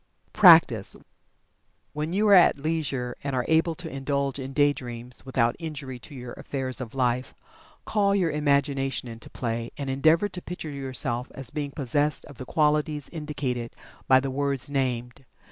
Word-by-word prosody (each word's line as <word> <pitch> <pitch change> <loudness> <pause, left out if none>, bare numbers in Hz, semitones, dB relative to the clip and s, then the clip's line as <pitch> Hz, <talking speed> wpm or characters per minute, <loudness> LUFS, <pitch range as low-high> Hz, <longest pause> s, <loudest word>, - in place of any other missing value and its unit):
PRACTICE. 160 - +6 1.0
When 150 +2 -3
you 205 +4 +2
are - - +7
at 180 -5 +6
leisure, 140 -5 -2
and 140 -1 -2
are 125 - 0
able 160 +1 +2
to 175 0 -5
indulge 140 -1 -2
in 135 0 -5
"day 145 +1 +3
dreams" 120 -2 -6
without 120 -2 +1
injury 145 -6 -6
to 140 - -11
your 125 -2 -8
affairs 130 -2 -3
of 120 0 -7
life, 125 -1 0 0.5
call 200 -2 +2
your 180 -5 +1
imagination 140 -3 0
into 115 -1 -10
play 115 -1 -3
and 140 -2 -3
endeavor 160 +8 +3
to 185 -2 -8
picture 175 -4 -6
yourself 130 -3 -2
as 130 -3 0
being 145 -2 -3
possessed 145 +1 +1
of 145 -6 -14
the 130 - -6
qualities 150 0 0
indicated 140 -7 -4 0.3
by 130 0 +6
the 135 0 -3
words 140 0 -1
named. 125 -2 -2
140 Hz, 160 wpm, -26 LUFS, 125-150 Hz, 1.0 s, are